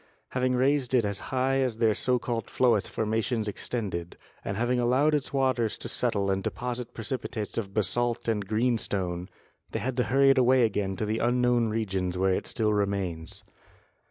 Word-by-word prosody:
Having 125 0 0
raised 130 0 +2
it 120 -4 +3
as 100 -1 -2
high 130 +1 +1
as 125 -4 0
their 115 -2 +3
so 125 +4 +1
called 120 -2 -3
Floetz 120 -5 +2
formations 110 +1 -1
extended, 100 -5 -4 0.3
and 100 - -3
having 120 +2 +1
allowed 130 +6 +3
its 145 -3 -1
waters 130 -5 +1
to - - -6
settle 100 -1 0
and 95 0 0
deposit 125 +2 -4
precipi 120 +2 -4
tates 110 -3 -5
of 100 -4 -3
basalt 115 +5 0
and 105 -3 0
greenstone, 100 -6 -1 0.4
they - - -3
had 130 0 -2
to 125 - +2
hurry 135 +5 +5
it 135 - +3
away 130 0 +5
again 100 -3 0
to 105 - -2
the 110 +1 -1
unknown 120 -1 +2
regions 95 -5 -2
where 95 0 +2
it - - -2
still 110 -2 0
remains. 95 -5 -2
115 Hz, 180 wpm, -28 LUFS, 100-125 Hz, 0.4 s, hurry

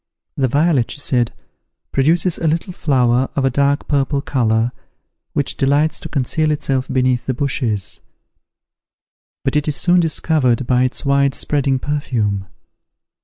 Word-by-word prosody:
"The 135 - +1
violet," 145 -2 +2
she - - -6
said, 125 -4 +1 0.6
"produces 165 +5 +2
a 165 - 0
little 165 +4 -1
flower 130 -5 +1
of 140 - +1
a 135 - +2
dark 140 +2 +1
purple 140 0 +1
colour, 120 -4 0 0.6
which 145 - -2
delights 145 +3 +2
to - - -8
conceal 155 +3 0
itself 135 -3 -1
beneath 130 -1 0
the 130 - -1
bushes; 120 -7 -2 1.4
but 135 - 0
it 150 0 +1
is 150 - 0
soon 180 +2 +3
discovered 150 -7 +1
by 125 +1 +2
its 130 - -4
wide 140 0 +2
spreading 140 -2 0
perfume." 115 -9 -2
140 Hz, 140 wpm, -18 LUFS, 125-150 Hz, 1.4 s, soon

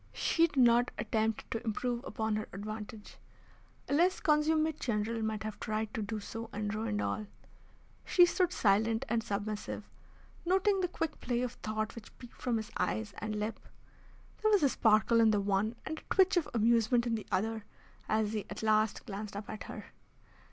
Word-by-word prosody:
She 335 0 +3
did 290 - -12
not 240 -1 +5
attempt 220 0 -1
to 225 - -2
improve 240 +2 -2
upon 220 -2 -1
her 215 - -3
advantage. 210 +1 -7 0.7
A - - -1
less 350 +5 +3
consummate 310 0 +2
general 225 0 -1
might 220 -1 -2
have 215 -1 -5
tried 215 0 -2
to 220 - -2
do 215 +1 -3
so, 225 +2 -7
and 210 0 -3
ruined 215 -1 -1
all. 215 - -2 0.8
She 355 - +6
stood 355 0 +1
silent 220 - +2
and 230 0 +1
submissive, 210 0 -3 0.6
noting 385 +3 +3
the 360 - +1
quick 325 -3 -3
play 245 0 -1
of 250 - -2
thought 215 -1 -3
which 230 -3 -12
peeped 245 - -13
from 245 -3 +1
his 220 +1 -5
eyes 110 0 -1
and 215 0 -3
lip. 215 +1 -3 0.8
There 435 - +3
was 410 -6 +4
a 280 - +5
sparkle 225 0 +4
in 225 - +6
the 210 -1 +3
one 200 +3 0
and 315 0 -4
a - - -5
twitch 380 0 +5
of 350 -4 +1
amusement 235 +1 +3
in 235 - 0
the 220 -2 -3
other, 220 +3 0 0.5
as 215 0 +1
he 210 -2 -3
at - - -6
last 215 -1 +2
glanced 205 0 -6
up 205 +2 -6
at 215 - -7
her. - - -9
220 Hz, 185 wpm, -32 LUFS, 215-250 Hz, 0.8 s, She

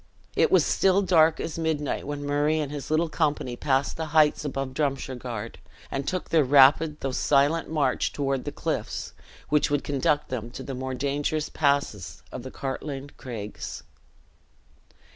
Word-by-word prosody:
It - - +3
was - - +5
still 195 +1 +3
dark 165 -4 +4
as 165 0 -4
midnight 155 -4 -1
when 145 0 -4
Murray 145 +2 +1
and 145 -2 -2
his 145 -2 -6
little 160 +2 +2
company 150 -5 -1
passed 135 +2 0
the 160 -1 -3
heights 150 -1 +4
above 135 -2 -3
Drumshargard, 130 -5 -3 0.3
and 135 0 -3
took 185 -1 -3
their 160 -2 +5
rapid 145 +3 +5
though 135 - -1
silent 145 +5 +2
march 145 -5 +1
toward 135 -2 -1
the - - -3
cliffs, - - -3 0.4
which 150 0 +3
would 145 -1 0
conduct 145 +1 0
them 120 -3 -4
to - - -7
the 135 - -5
more 130 0 -4
dangerous 145 +3 -1
passes 140 - -1
of 130 - -6
the 130 - -7
Cartlane 135 +1 -5
Craigs. 110 -5 -7
145 Hz, 160 wpm, -26 LUFS, 130-150 Hz, 0.4 s, was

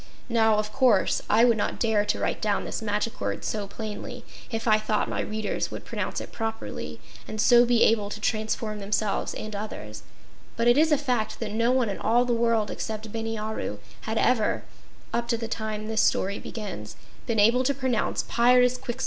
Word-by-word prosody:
Now, 225 -2 +4
of 210 0 -2
course, 240 -7 +3
I 225 +3 +6
would 235 -2 +4
not 205 - -2
dare 220 -3 +2
to 205 - 0
write - - -2
down 210 -1 0
this - - -4
magic 210 +1 -2
word - - -2
so 210 -2 -2
plainly 215 0 -7 0.2
if 225 0 -3
I 215 -1 +5
thought 215 0 0
my - - -2
readers 215 -1 -2
would - - -8
pronounce - - -3
it - - -8
properly 225 -1 -5 0.3
and 215 - -6
so 240 +2 +6
be 240 -1 +4
able 210 -2 +3
to 210 - -6
transform 215 0 -1
themselves 205 0 -1
and 215 -1 -6
others, 110 - -6 0.6
but 230 +1 +2
it 240 - +6
is 315 +2 +4
a 300 - +5
fact 250 -6 -1
that 225 -3 -3
no 230 +3 +2
one 255 -2 +2
in 200 - -3
all 240 +2 +3
the 245 - +1
world 230 -2 +1
except 220 0 -5
Bini 225 0 -3
Aru, 215 - -3 0.3
had 220 - -1
ever 220 -2 +2 0.5
(up 235 0 0
to 235 -1 +1
the 230 0 -4
time 215 -1 -4
this 220 0 +2
story 200 +2 +1
begins) 180 - -7 0.3
been 230 - 0
able 235 +5 +5
to 260 - +2
pronounce 260 -4 0
"Pyrzqxgl!" 250 +1 +3
220 Hz, 195 wpm, -26 LUFS, 210-235 Hz, 0.6 s, I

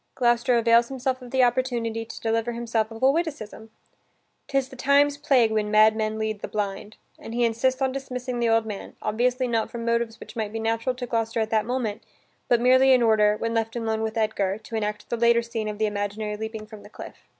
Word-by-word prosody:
Gloucester 240 0 +2
avails 235 0 +4
himself 260 0 -3
of 250 - -10
the 260 +1 +3
opportunity 240 -2 0
to - - -10
deliver 230 +1 0
himself 230 -2 -1
of 225 +2 -9
a 265 - +6
witticism: 280 -9 -4 0.8
"'Tis 275 -1 0
the 265 - -11
times' 280 +2 +3
plague 250 -6 +3
when 215 -1 0
madmen 215 0 +3
lead 215 -1 -3
the - - -4
blind," 205 0 -4 0.2
and 225 - -8
he 240 0 +2
insists 255 +4 0
on 265 - +1
dismissing 255 -2 -5
the 235 -1 +1
old 225 0 +3
man, 210 -2 -7
obviously 250 +4 0
not 230 -2 0
from 230 -1 -6
motives 235 -1 -1
which 215 - -11
might 215 -2 -3
be 225 - -4
natural 225 +3 -1
to 250 0 -5
Gloucester 225 -1 -1
at 220 0 -1
that 220 -1 +1
moment, 245 -4 -2 0.5
but 240 - +3
merely 260 +2 +5
in 250 -2 +4
order, 210 -2 +4
when 230 +1 -2
left 225 0 -1
alone 220 -2 -1
with 220 +1 -3
Edgar, 205 -3 0
to 225 +1 -9
enact 210 -1 -3
the 235 - 0
later 235 0 +4
scene 230 -2 -4
of 210 -1 -4
the 215 - +1
imaginary 210 +1 -3
leaping 220 0 -6
from 215 -1 -12
the - - -14
cliff. - - -10
230 Hz, 215 wpm, -25 LUFS, 220-245 Hz, 0.8 s, a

